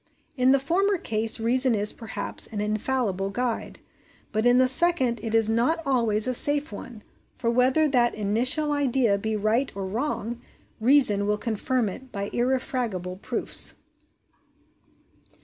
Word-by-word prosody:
In 255 -1 +3
the 275 - +5
former 370 +8 0
case 225 -6 0
reason 250 +2 +3
is, 205 0 +1
perhaps, 225 -2 -6
an 210 - -6
infallible 210 -2 -2
guide, 240 +3 -4 0.5
but 220 +2 0
in 245 0 +4
the 255 0 +4
second 260 -5 +3
it 225 0 -3
is 225 -1 +3
not 235 +9 +1
always 230 -6 +2
a 255 - 0
safe 290 +2 +1
one; 215 +1 -10 0.3
for 230 -2 -1
whether 260 +6 +2
that 245 -4 +1
initial 245 +9 +2
idea 260 -7 +1
be 220 +2 -3
right 215 +6 0
or 195 -1 -4
wrong, 235 +2 -4 0.4
reason 220 -5 +4
will 210 0 0
confirm 230 +2 -1
it 255 +6 -9
by 200 -1 -5
irrefragable 240 -7 -2
proofs. - - 0
235 Hz, 145 wpm, -25 LUFS, 215-260 Hz, 0.5 s, the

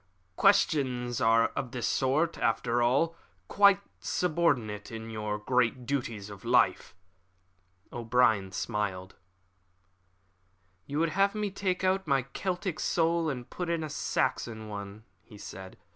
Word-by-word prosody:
"Questions 130 - +2
of 115 +3 +2
this 125 -2 -2
sort 145 +6 +1
are, - - -11
after 120 0 +1
all, 140 +8 +2 0.3
quite 200 -1 +5 0.2
subordinate 145 - 0
to 115 - -7
the 110 -2 -4
great 125 0 +1
duties 115 -6 -3
of 100 - -11
life." 90 - +2 1.0
O'Brien 115 -5 +2
smiled. 95 -2 -3 1.7
"You 145 - -3
would 165 +1 +2
have 195 +4 +2
me 210 -2 -2
take 190 -1 -2
out 190 -1 +1
my 135 -3 +2
Celtic 180 +5 -3
soul 165 -1 +1
and 125 -4 -5
put 180 -2 -5
in 165 -1 0
a 155 - -5
Saxon 110 -5 -2
one," 100 0 -7 0.2
he 105 +4 -15
said. 95 -2 -9
125 Hz, 130 wpm, -29 LUFS, 110-165 Hz, 1.7 s, quite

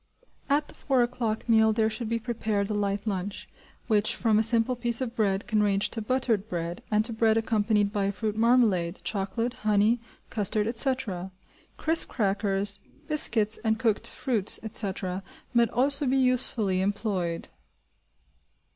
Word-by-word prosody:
At 290 +1 +1
the - - -14
four 265 -4 +1
o'clock 240 -3 -3
meal 220 -1 +4
there 220 0 +2
should 220 +1 -4
be 230 - 0
prepared 220 -3 -2
a - - 0
light 200 0 -2
lunch, 200 -1 -4 0.4
which 215 -2 +2
from 220 -2 +2
a - - +4
simple 230 +2 +2
piece 235 -1 +1
of 245 -2 -4
bread 200 -3 0
can 215 -2 +1
range 200 -1 +1
to 225 - -4
buttered 225 -3 -1
bread, 170 0 -4
and 215 0 +2
to 235 - -3
bread 220 0 +2
accompanied 215 -2 +1
by 200 -1 0
a 200 - 0
fruit 215 +1 -3
marmalade, 220 -7 +2
chocolate, 210 +4 -2
honey, 215 +2 +1 0.3
custard, 210 0 0
etc. 230 -6 0 0.5
Crisp 325 +1 +3
crackers, 200 -2 0 0.3
biscuits, 225 -8 +3
and 220 -1 +1
cooked 220 -3 0
fruits, 225 -7 +1
etc., 195 -3 -3 0.3
might 235 -2 +3
also 275 +4 +1
be 265 +2 +2
usefully 240 -7 +2
employed. 195 -4 -2
220 Hz, 155 wpm, -27 LUFS, 200-235 Hz, 0.5 s, meal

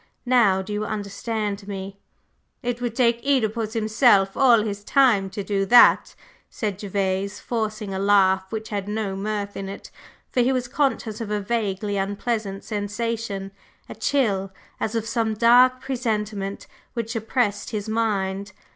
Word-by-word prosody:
Now, 230 -7 +4
do 210 +2 -6
you 210 +1 -1
understand 210 0 -3
me?" 195 0 -6 0.6
"It 245 0 -2
would 240 -2 -2
take 235 -2 +2
Œdipus 225 -5 0
himself 215 -3 +3
all 240 -5 +5
his 205 -2 -4
time 220 -6 +3
to 200 +1 -5
do 195 0 0
that," 240 +2 +6 0.3
said 205 -3 -4
Gervase, 195 0 -2
forcing 215 -3 -3
a 190 - -2
laugh 190 -1 +3
which 220 0 -5
had 200 -2 -3
no 210 -2 -2
mirth 205 0 -3
in 195 0 -5
it, 195 - -9 0.4
for - - 0
he 250 +2 +3
was 255 -2 -1
conscious 245 -5 -1
of 220 - -4
a 210 0 0
vaguely 205 -1 -2
unpleasant 200 0 -2
sensation 205 -1 -3 0.4
a - - -7
chill, 200 -9 0 0.3
as 220 - -2
of 225 -1 -1
some 230 -2 0
dark 250 +3 +5
presentiment, 215 -6 -3 0.3
which 230 0 -3
oppressed 225 -1 -1
his 210 -1 -4
mind. 200 -3 -1
215 Hz, 150 wpm, -23 LUFS, 200-235 Hz, 0.6 s, that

